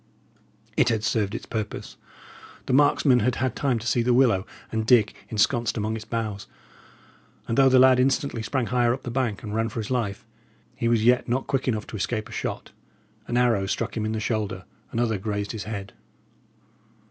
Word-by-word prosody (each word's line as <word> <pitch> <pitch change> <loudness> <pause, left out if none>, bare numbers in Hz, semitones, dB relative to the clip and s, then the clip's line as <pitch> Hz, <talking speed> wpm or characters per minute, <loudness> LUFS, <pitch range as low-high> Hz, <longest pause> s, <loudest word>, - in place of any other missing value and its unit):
It - - +3
had 110 -2 0
served 110 -1 0
its - - -6
purpose. 110 -2 -5 0.7
The 130 - -1
marksmen 135 -2 +4
had 120 +2 +1
had 130 -1 -1
time 135 -4 +1
to 110 - -7
see 120 - +2
the 120 +1 +2
willow, 115 -7 +3 0.2
and 110 0 -1
Dick 110 -2 +4 0.2
ensconced 115 +1 +1
among 110 +1 -1
its 110 -1 -7
boughs; 110 -3 -4 1.0
and 115 - -1
though 135 0 +6
the 130 - +5
lad 130 0 +6
instantly 135 -2 +1
sprang 120 +4 -1
higher 120 0 +2
up 135 - -14
the 120 - -5
bank, 120 -5 -1
and 105 -2 -5
ran 115 +1 0
for 115 - -5
his 110 +2 -5
life, 110 -6 -2 0.5
he 115 - -1
was 115 -2 +2
yet 125 0 +3
not 130 +2 0
quick 135 -1 -1
enough 110 -4 -1
to 110 - -7
escape 110 +2 -2
a - - -14
shot. - - -4 0.6
An 120 - -1
arrow 115 -6 +2
struck - - -2
him 110 - -2
in 110 - -1
the 110 - -2
shoulder, 110 -3 -2 0.3
another 115 -3 0
grazed 105 0 -3
his 110 -3 -6
head. 100 -2 -6
115 Hz, 195 wpm, -25 LUFS, 110-125 Hz, 1.0 s, though